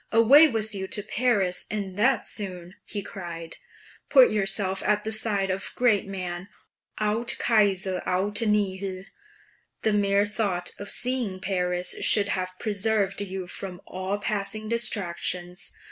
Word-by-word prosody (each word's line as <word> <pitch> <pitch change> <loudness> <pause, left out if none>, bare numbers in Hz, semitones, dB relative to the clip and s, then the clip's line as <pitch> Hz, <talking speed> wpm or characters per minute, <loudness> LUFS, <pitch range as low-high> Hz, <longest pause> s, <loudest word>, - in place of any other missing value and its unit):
"Away 260 +8 +7
with 220 -5 -1
you 190 -1 -4
to 205 - -1
Paris, 205 -6 0
and 200 -3 -4
that 235 +5 +2
soon!" 180 -4 -3
he 205 -2 -5
cried. 170 -4 -7 0.5
"Put 265 -3 +7
yourself 195 -2 0
at 210 0 +1
the 220 - -3
side 210 -3 +2
of 190 +1 -4
great 225 -6 +2
men 180 -2 -5 0.5
aut 220 +3 +1
Cosar 195 -4 +2
aut 200 +4 +1
nihil! 195 -3 -1 0.8
The 220 - +2
mere 200 0 +2
thought 200 -4 -2
of 205 - -7
seeing 245 -7 -1
Paris 180 -2 -1
should 205 -2 +5
have 185 -1 -3
preserved 205 -1 -1
you 190 -2 -5
from 180 0 -6
all 185 +2 -3
passing 210 +1 -2
distractions. 180 -5 -2
200 Hz, 135 wpm, -26 LUFS, 185-215 Hz, 0.8 s, Away